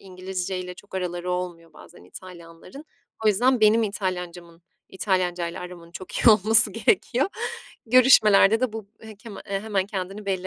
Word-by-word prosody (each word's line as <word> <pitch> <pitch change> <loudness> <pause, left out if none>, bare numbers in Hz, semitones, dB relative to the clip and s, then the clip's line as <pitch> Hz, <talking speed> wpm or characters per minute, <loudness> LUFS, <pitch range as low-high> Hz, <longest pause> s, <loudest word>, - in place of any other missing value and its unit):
İngilizce 185 0 -6
ile 180 0 -7
çok 205 +1 -16
araları 180 -1 -4
olmuyor 175 -2 -5
bazen 170 - -17
İtalyanlar'ın. 180 - -13 0.4
O - - +4
yüzden, 245 +4 +2
benim 220 +2 +4
İtalyanca'mın, 180 -4 -5 0.3
İtalyanca'yla 180 -3 -2
aramın 175 -2 -11
çok 185 +1 -10
iyi - - +4
olması 215 +1 +5
gerekiyor. 260 - 0 0.6
Görüşmelerde 225 -3 +5
de 255 -4 -1
bu 220 -2 -8
he 220 -1 -12
keme 220 -1 -11
eee, 195 0 -2
hemen 200 -3 -2
kendini 195 +1 -6
belli 190 -1 -2
190 Hz, 150 wpm, -23 LUFS, 180-215 Hz, 0.6 s, olması